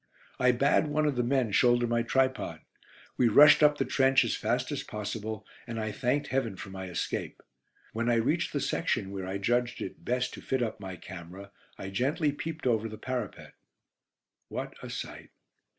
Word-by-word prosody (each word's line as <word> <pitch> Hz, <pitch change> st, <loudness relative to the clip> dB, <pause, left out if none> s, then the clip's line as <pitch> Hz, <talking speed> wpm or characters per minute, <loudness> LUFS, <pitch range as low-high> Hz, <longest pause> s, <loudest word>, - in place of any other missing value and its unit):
I 125 Hz, 0 st, +5 dB
bade 140 Hz, +5 st, +3 dB
one 150 Hz, +1 st, +1 dB
of 145 Hz, -2 st, +1 dB
the 125 Hz, -, +1 dB
men 125 Hz, -2 st, +1 dB
shoulder 120 Hz, +3 st, +4 dB
my 120 Hz, 0 st, +1 dB
tripod. 130 Hz, +2 st, 0 dB, 0.6 s
We 125 Hz, -, +4 dB
rushed 145 Hz, +8 st, +8 dB
up 150 Hz, -1 st, +5 dB
the -, -, 0 dB
trench 135 Hz, 0 st, +4 dB
as -, -, 0 dB
fast -, -, -1 dB
as -, -, -2 dB
possible, 105 Hz, 0 st, -5 dB, 0.2 s
and 115 Hz, -1 st, -4 dB
I 110 Hz, -1 st, -2 dB
thanked 130 Hz, +7 st, 0 dB
Heaven 130 Hz, -6 st, 0 dB
for 100 Hz, +1 st, -8 dB
my 95 Hz, 0 st, -6 dB
escape. 90 Hz, -, -4 dB, 0.5 s
When 115 Hz, +2 st, 0 dB
I 120 Hz, -, +4 dB
reached 115 Hz, -, +1 dB
the -, -, -1 dB
section 95 Hz, -, -1 dB
where 95 Hz, -2 st, -5 dB
I 95 Hz, +1 st, -2 dB
judged 120 Hz, +4 st, 0 dB
it -, -, -7 dB
best 125 Hz, +1 st, -1 dB
to -, -, -8 dB
fit 130 Hz, -2 st, 0 dB
up 110 Hz, -2 st, -3 dB
my 95 Hz, -2 st, -6 dB
camera, 90 Hz, +3 st, -10 dB, 0.3 s
I 95 Hz, -, -6 dB
gently 140 Hz, -, +1 dB
peeped 160 Hz, +2 st, -6 dB
over 115 Hz, -2 st, +1 dB
the 110 Hz, -, -8 dB
parapet. 125 Hz, -2 st, -5 dB, 0.9 s
What -, -, -5 dB
a -, -, -7 dB
sight. -, -, -6 dB
120 Hz, 185 wpm, -29 LUFS, 105-130 Hz, 0.9 s, rushed